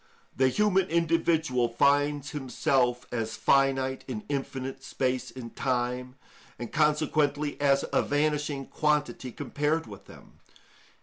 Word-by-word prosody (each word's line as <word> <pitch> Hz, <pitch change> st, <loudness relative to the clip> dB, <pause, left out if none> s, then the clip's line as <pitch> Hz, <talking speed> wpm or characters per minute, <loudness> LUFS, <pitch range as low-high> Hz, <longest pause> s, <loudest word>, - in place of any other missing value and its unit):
The 130 Hz, 0 st, +3 dB
human 195 Hz, +4 st, +2 dB
individual 160 Hz, -6 st, +1 dB
finds 145 Hz, +3 st, +2 dB
himself 125 Hz, -2 st, 0 dB
as 110 Hz, -2 st, -3 dB
finite 135 Hz, -1 st, +2 dB
in 215 Hz, -, -5 dB
infinite 135 Hz, -1 st, -4 dB
space 130 Hz, -1 st, -2 dB
and 115 Hz, -1 st, -9 dB
time, 125 Hz, 0 st, -2 dB, 0.4 s
and 120 Hz, -, -6 dB
consequently 150 Hz, -1 st, +1 dB
as 140 Hz, -1 st, +3 dB
a -, -, +4 dB
vanishing 145 Hz, -1 st, 0 dB
quantity 150 Hz, -4 st, -1 dB
compared 150 Hz, +5 st, -1 dB
with 100 Hz, -4 st, -12 dB
them. -, -, -16 dB
140 Hz, 115 wpm, -28 LUFS, 125-150 Hz, 0.4 s, a